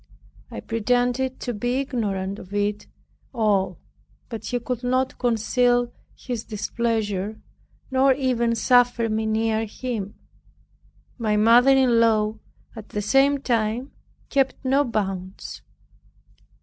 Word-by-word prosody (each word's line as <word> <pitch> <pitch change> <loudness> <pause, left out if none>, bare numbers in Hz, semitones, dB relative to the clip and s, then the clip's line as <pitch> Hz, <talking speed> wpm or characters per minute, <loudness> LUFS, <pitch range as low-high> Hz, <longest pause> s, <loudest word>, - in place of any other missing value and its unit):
I - - -7
pretended 245 +3 0
to 245 - -3
be 245 +4 -1
ignorant 205 -8 -2
of 190 +2 -9
it 205 0 -1 0.5
all 200 -5 +1 0.5
but 225 -3 -6
he 245 - -1
could 245 0 -4
not 255 +1 0
conceal 245 +1 +1 0.2
his 240 -3 -5
displeasure, 215 -2 -2 0.5
nor 265 +1 +4
even 240 -3 +1
suffer 245 -1 +3
me 220 0 -1
near 220 0 0
him. 215 -3 -5 1.0
My 215 -2 +1
mother 235 +5 +6
in 250 -3 +4
law 220 -1 +2 0.4
at 220 -2 -10
the 210 - -3
same 275 +5 +3
time 235 +1 -1 0.4
kept 270 0 0
no 270 +2 +3
bounds. 195 -6 -4
230 Hz, 115 wpm, -24 LUFS, 215-250 Hz, 1.0 s, mother